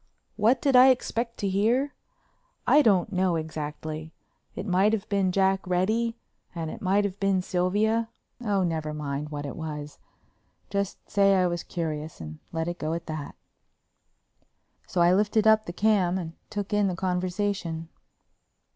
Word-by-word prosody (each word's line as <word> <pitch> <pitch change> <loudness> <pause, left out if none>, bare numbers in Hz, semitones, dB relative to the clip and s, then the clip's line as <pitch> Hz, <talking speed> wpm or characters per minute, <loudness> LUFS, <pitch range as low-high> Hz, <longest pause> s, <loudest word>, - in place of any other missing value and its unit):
What 230 +4 +2
did 275 -2 +3
I 250 +1 +9
expect 235 -2 0
to 200 - -1
hear? 230 +9 +1 0.7
I 300 - +6
don't 205 -5 +3
know 185 -1 +2
exactly. 155 0 -5 0.4
It - - -5
might 195 +2 +3
have 215 -1 -2
been 195 -2 +2
Jack 195 0 +3
Reddy 220 +6 +1 0.4
and 165 -2 -3
it - - -9
might 200 +2 +2
have 195 -1 -4
been 195 -2 +1
Sylvia—oh, 210 +3 -1
never 160 -3 -2
mind 145 0 -4
what 145 -1 -5
it 140 - -5
was—just 160 +5 -7
say 195 -1 +4
I 185 -1 +3
was 175 -1 -1
curious 155 -3 -4
and 75 -1 -8
let 165 0 -2
it 175 0 -4
go 155 +1 -2
at 170 0 -6
that. 155 -3 -6 1.5
So 180 - 0
I 175 +1 +5
lifted 210 +2 +2
up 220 0 +5
the - - -3
cam 190 -2 +2
and 165 -3 -5 0.2
took 205 -1 -4
in 205 -1 +3
the 185 - -1
conversation. 180 -2 -2
185 Hz, 155 wpm, -27 LUFS, 165-210 Hz, 1.5 s, I